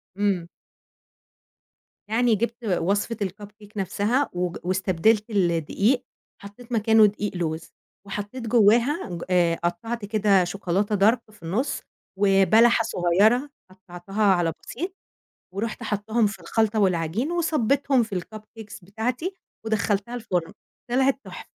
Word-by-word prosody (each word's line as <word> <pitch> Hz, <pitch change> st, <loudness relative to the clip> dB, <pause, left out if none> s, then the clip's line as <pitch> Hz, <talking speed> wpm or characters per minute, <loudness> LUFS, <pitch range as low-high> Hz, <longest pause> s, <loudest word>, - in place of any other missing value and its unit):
امم. 195 Hz, -4 st, 0 dB, 1.6 s
يعني 235 Hz, +1 st, +3 dB
جِبت 235 Hz, +3 st, -3 dB
وصفة 200 Hz, +4 st, 0 dB
الCupcake 205 Hz, +2 st, -9 dB
نفسها، 210 Hz, +8 st, 0 dB
وج 180 Hz, -1 st, -2 dB
واستبدلت 190 Hz, +4 st, +1 dB
الدقيق، 200 Hz, -, +1 dB, 0.4 s
حطيت 205 Hz, +5 st, -13 dB
مكانه 220 Hz, -1 st, +5 dB
دقيق 205 Hz, -1 st, -2 dB
لوز، 160 Hz, -2 st, -3 dB, 0.4 s
وحطيت 210 Hz, +4 st, -5 dB
جواها، 235 Hz, -, +3 dB
ج 170 Hz, -1 st, -5 dB
آآ، 175 Hz, -2 st, +3 dB
قطّعت 205 Hz, +7 st, -3 dB
كده 205 Hz, -3 st, +3 dB
شوكولاتة 195 Hz, +3 st, -1 dB
Dark 210 Hz, +5 st, +4 dB
في 210 Hz, -, -20 dB
النُص، 205 Hz, -, -2 dB, 0.4 s
وبلحة 205 Hz, +4 st, +5 dB
صغيرة 215 Hz, +8 st, +2 dB, 0.2 s
قطّعتها 185 Hz, +2 st, -5 dB
على 175 Hz, -5 st, +3 dB
بسيط، 355 Hz, +9 st, -5 dB, 0.6 s
ورُحت 215 Hz, +3 st, -4 dB
حطاهم 215 Hz, +2 st, 0 dB
في 205 Hz, -, -5 dB
الخلطة 220 Hz, -1 st, 0 dB
والعجين، 190 Hz, -, 0 dB
وصبيتهم 280 Hz, -5 st, +2 dB
في 200 Hz, -5 st, -3 dB
الCupcakes 215 Hz, +1 st, -11 dB
بتاعتي، 245 Hz, -, -3 dB, 0.3 s
ودخّلتها 215 Hz, +1 st, -1 dB
الفُرن، 185 Hz, -8 st, -2 dB, 0.4 s
طلعت 265 Hz, +2 st, +2 dB
تُحفة. -, -, -9 dB
210 Hz, 115 wpm, -24 LUFS, 190-230 Hz, 1.6 s, مكانه